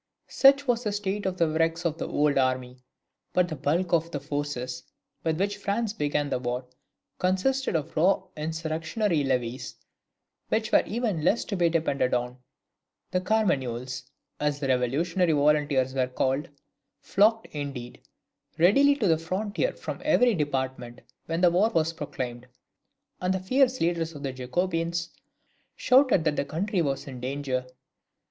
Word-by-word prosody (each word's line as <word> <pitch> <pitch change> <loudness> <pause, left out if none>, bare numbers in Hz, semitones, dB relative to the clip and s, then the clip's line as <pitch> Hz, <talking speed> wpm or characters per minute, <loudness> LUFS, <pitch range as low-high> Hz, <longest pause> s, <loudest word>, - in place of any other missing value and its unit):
Such 275 +1 +5
was 240 -1 +1
the 210 - -1
state 205 -1 -2
of 185 -1 -2
the 170 -2 +3
wrecks 165 +2 0
of 165 0 -1
the - - -3
old 145 -1 +1
army; 130 -1 -1 0.5
but 180 -1 +3
the 160 - -4
bulk 165 +6 0
of 165 0 +2
the 145 - -4
forces 140 -3 -4 0.4
with 160 -1 0
which 200 +1 0
France 205 +2 -1
began 145 -5 -1
the - - 0
war, 125 0 -3 0.5
consisted 190 +7 +1
of 155 -3 -2
raw 185 +4 +3
insurrectionary 160 +3 -1
levies, 125 -2 -2 0.7
which 220 0 0
were - - +6
even 215 -7 -1
less 205 +7 +2
to 205 - -3
be 175 -2 +3
depended 140 -6 +1
on. 125 +1 -3 0.7
The 180 - +1
Carmagnoles, 130 - -1 0.3
as 150 -1 0
the 135 -2 -2
revolutionary 155 +8 +1
volunteers 145 -3 +2
were 130 -1 +1
called, 135 +5 -1 0.5
flocked, 220 +3 +2
indeed, 140 -5 -6 0.6
readily 275 - +5
to 230 -8 0
the 160 -2 +3
frontier 200 - -2
from - - -7
every 250 -5 +4
department 130 - -3 0.3
when 165 +1 -1
the 175 -2 +5
war 195 +6 +3
was 165 -6 +1
proclaimed, 125 -5 -5 0.7
and 180 0 +1
the - - -1
fierce 255 +6 +2
leaders 165 -1 0
of 145 - -8
the 135 -2 -3
Jacobins 165 +5 -2 0.6
shouted 255 - +4
that 155 -2 0
the - - +1
country 180 +6 -1
was 140 -4 -2
in 130 -3 -8
danger. 130 0 -3
160 Hz, 155 wpm, -27 LUFS, 135-190 Hz, 0.7 s, were